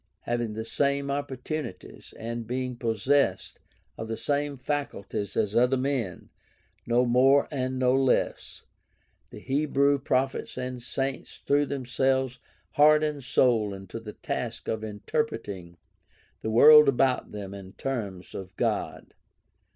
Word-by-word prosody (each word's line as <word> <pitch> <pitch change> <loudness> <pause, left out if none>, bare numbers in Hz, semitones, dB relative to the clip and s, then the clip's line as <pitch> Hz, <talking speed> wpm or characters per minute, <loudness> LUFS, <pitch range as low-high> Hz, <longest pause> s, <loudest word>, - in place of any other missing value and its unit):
Having 120 -2 -2
the 110 +1 -5
same 140 +4 0
opportunities 145 - -5
and 115 0 -5
being 125 +1 -3
possessed 115 -2 0 0.4
of 110 - -4
the 115 0 -3
same 145 +4 -1
facul 140 -6 -3
ties 100 0 -4
as 105 0 0
other 125 +2 +4
men, 130 -8 -3 0.6
no 120 +1 +3
more 130 +3 +4
and 130 -2 -2
no 130 0 +3
less, 135 -1 0 0.7
the - - -11
Hebrew 140 0 +1
prophets 130 0 -1
and 125 -1 -4
saints 135 +2 -4
threw 145 0 +3
themselves 130 -1 0 0.3
heart 150 +1 +5
and 150 -2 -2
soul 115 -5 +2
into 95 +3 -8
the 110 -2 -9
task - - -5
of 110 -1 -2
interpreting 105 - -4 0.6
the 110 - -3
world 150 +6 +8
about 130 -1 +1
them 100 -2 -7
in 95 -1 -10
terms 105 -9 -5
of 95 -1 -8
God. - - -2
125 Hz, 130 wpm, -27 LUFS, 110-140 Hz, 0.7 s, world